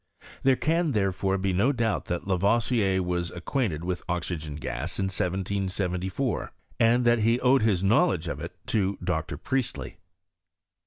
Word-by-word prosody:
There 135 -1 +4
can, 165 +2 +1
there 95 -3 +2
fore, 95 +1 0
be 95 0 0
no 105 +10 +3
doubt 115 -6 -1
that 85 -1 -3
Lavoisier 100 0 +2
was 90 -1 -1
acquainted 85 - -2
with 90 -1 -2
oxygen 80 -4 -3
gas 75 +2 -4
in - - 0
1 95 - 0
774, 95 +3 -2 0.3
and 120 +2 +4
that 120 0 +4
he 115 +3 +3
owed 130 +1 +4
his 100 -5 +2
know 100 +4 +5
ledge 90 -2 -2
of - - -3
it - - -7
to 100 -2 0
Dr. - - -2
Priestley. 110 - -3
95 Hz, 160 wpm, -27 LUFS, 90-115 Hz, 0.3 s, know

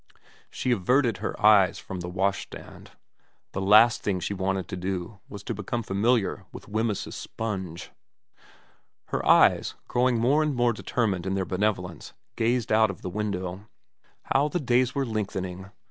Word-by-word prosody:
She 130 - -2
averted 120 +2 +2
her - - -4
eyes 105 -3 +5
from 95 - -7
the 90 0 -5
washstand. 95 +2 -4 0.6
The 95 - -3
last 110 +5 +6
thing 95 -3 -1
she 100 - -3
wanted 95 -1 -2
to - - -4
do 95 +2 -4
was 100 -1 -9
to 115 - -3
become 110 +3 -3
familiar 100 0 +1
with - - -11
Wemyss's 110 0 -2
sponge. 95 -7 -5 1.2
Her - - -2
eyes, - - +4
growing 125 -1 +2
more 135 +7 +3
and 150 -3 0
more 120 -1 +2
determined 100 -5 -1
in 95 - -1
their 95 -1 -1
benevolence, 90 -3 -2 0.2
gazed 120 +1 0
out 110 0 +4
of 100 - -8
the 90 - -4
window. 95 -1 -4 0.7
How 140 +2 +3
the 175 +4 -2
days 125 -2 +1
were 140 -1 0
lengthening. 95 -4 -4
105 Hz, 155 wpm, -26 LUFS, 95-120 Hz, 1.2 s, last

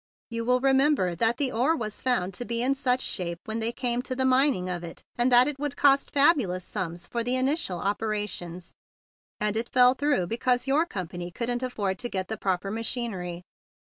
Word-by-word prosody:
You 230 0 -3
will 250 +1 +2
remember 270 - +3
that 225 +7 +1
the 270 -2 +1
ore 260 +8 +2
was 215 -8 -5
found 195 -8 0
to 245 - -5
be 235 0 -1
in 265 +2 +2
such 260 -2 0
shape 170 -2 -3
when 220 +1 -3
they 225 +1 0
came 245 0 0
to 255 0 -5
the 260 0 0
mining 260 -7 +3
of 175 -1 -4
it 170 - -9
that 245 +1 +5
it 290 -2 -3
would 290 -1 -3
cost 275 -1 +4
fabu¬ 285 - +4
lous 180 0 -4
sums 175 -3 -4
for 235 -1 -3
the 245 +2 +1
initial 260 - 0
operations, 200 -3 -3 0.7
and 210 -1 0
it 230 +2 -1
fell 250 -1 +6
through 280 -7 +1
because 245 +5 0
your 295 +5 +2
company 175 - -5
couldn't 240 +6 -2
afford 205 -7 -2
to 240 - -3
get 185 -3 -3
the 220 - -3
proper 195 -1 -1
ma¬ 225 +2 -3
chinery. 185 -8 -3
235 Hz, 200 wpm, -27 LUFS, 190-260 Hz, 0.7 s, fell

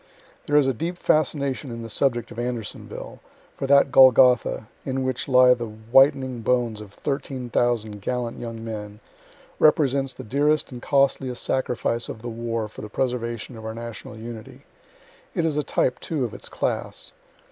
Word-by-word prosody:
"There 145 - +1
is 145 -2 +6
a 135 - +2
deep 170 +9 -4
fascination 140 -4 0
in 115 -1 -6
the - - -6
subject 120 -2 0
of 115 - -7
Andersonville 120 -4 -5 0.3
for 135 - -4
that 140 0 +5
Golgotha, 125 -4 +6 0.2
in 130 -1 -2
which 130 -1 -2
lie 125 -1 +7
the 120 -2 -4
whitening 130 +3 +3
bones 115 -2 0
of 105 -2 -11
13,000 120 -5 -2
gallant 120 +2 -3
young 115 -1 -6
men, 105 -2 -6 0.6
represents 140 -3 +3
the - - -9
dearest 145 +6 +1
and 125 -1 -8
costliest 135 -3 +1
sacrifice 120 -2 -1
of 110 - -8
the 120 - -4
war 115 -1 -3
for 105 - -11
the 105 - -7
preservation 120 0 -3
of 110 - -10
our 110 0 -5
national 115 -1 -8
unity. 115 -1 -9 0.7
It 170 - +1
is 155 -3 0
a 150 - +2
type, 125 -3 0
too, 150 -6 -2
of 115 - -6
its - - -7
class. - - -3
125 Hz, 165 wpm, -24 LUFS, 115-135 Hz, 0.7 s, lie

